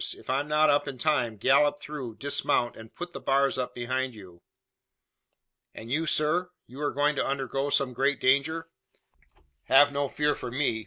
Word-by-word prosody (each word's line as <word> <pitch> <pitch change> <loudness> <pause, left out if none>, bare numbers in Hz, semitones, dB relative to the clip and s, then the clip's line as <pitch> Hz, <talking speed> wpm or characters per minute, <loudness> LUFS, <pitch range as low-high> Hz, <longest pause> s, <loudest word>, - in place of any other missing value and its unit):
If - - -6
I'm 140 +2 0
not 150 0 +4
up 145 +1 +1
in 135 -2 -5
time, 125 -6 0
gallop 145 +6 +3
through, 140 -7 -7
dismount, 130 -3 0
and 110 0 -12
put 175 0 -8
the - - -6
bars 135 0 +1
up 125 - -4
behind 130 +1 -2
you." 90 -5 -14 1.3
"And 115 +2 -9
you, 160 +4 0
sir? 155 +4 +1 0.2
You 130 +4 -11
are 145 - +1
going 145 +1 +1
to - - +1
undergo 135 +1 -2
some 135 -2 +1
great 135 +3 0
danger?" 150 +5 +1 1.0
"Have 145 +2 +6
no 140 -1 -1
fear 150 0 +1
for - - -6
me! 125 -3 0
140 Hz, 175 wpm, -27 LUFS, 125-150 Hz, 1.3 s, Have